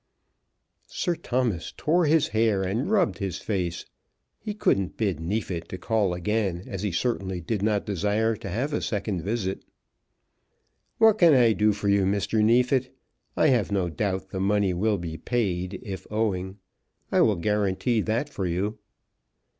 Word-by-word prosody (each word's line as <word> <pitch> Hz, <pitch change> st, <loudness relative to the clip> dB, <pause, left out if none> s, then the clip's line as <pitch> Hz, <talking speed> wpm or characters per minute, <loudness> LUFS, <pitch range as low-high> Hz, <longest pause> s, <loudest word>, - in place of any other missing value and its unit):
Sir 175 Hz, -, -1 dB
Thomas 120 Hz, -, -2 dB
tore 165 Hz, +1 st, +2 dB
his 155 Hz, 0 st, +3 dB
hair 110 Hz, -3 st, +2 dB
and 105 Hz, +8 st, -1 dB
rubbed 200 Hz, -6 st, +2 dB
his 100 Hz, -3 st, -3 dB
face. 90 Hz, -5 st, -3 dB, 0.5 s
He 210 Hz, -1 st, -5 dB
couldn't 100 Hz, -, 0 dB
bid 100 Hz, -8 st, 0 dB
Neefit 90 Hz, -1 st, -3 dB
to 95 Hz, -, -5 dB
call 100 Hz, -1 st, 0 dB
again, 95 Hz, -1 st, -1 dB
as 95 Hz, -2 st, -5 dB
he 105 Hz, -2 st, -1 dB
certainly 95 Hz, -2 st, -1 dB
did 95 Hz, +5 st, -3 dB
not 105 Hz, -1 st, +1 dB
desire 105 Hz, +3 st, 0 dB
to 100 Hz, -, -7 dB
have 125 Hz, -, -2 dB
a -, -, 0 dB
second 100 Hz, -4 st, -2 dB
visit. 95 Hz, 0 st, -2 dB, 1.3 s
"What 220 Hz, -1 st, +5 dB
can 170 Hz, -5 st, +7 dB
I 120 Hz, -3 st, +5 dB
do 105 Hz, 0 st, +3 dB
for 105 Hz, 0 st, -3 dB
you, 100 Hz, -1 st, +3 dB
Mr. 100 Hz, +2 st, +1 dB
Neefit? 125 Hz, +3 st, +2 dB, 0.4 s
I 155 Hz, -, +4 dB
have 120 Hz, -6 st, +2 dB
no 95 Hz, -3 st, 0 dB
doubt 95 Hz, +1 st, -2 dB
the 95 Hz, -, -3 dB
money 100 Hz, -1 st, +2 dB
will 105 Hz, +4 st, +1 dB
be 80 Hz, -2 st, -5 dB
paid, 95 Hz, -6 st, -2 dB
if 95 Hz, -2 st, -7 dB
owing. 100 Hz, -3 st, -1 dB, 0.5 s
I -, -, +4 dB
will 105 Hz, -, +4 dB
guarantee 105 Hz, +5 st, 0 dB
that 115 Hz, +7 st, -1 dB
for 95 Hz, -9 st, -3 dB
you." 100 Hz, +5 st, -2 dB
105 Hz, 160 wpm, -26 LUFS, 95-115 Hz, 1.3 s, can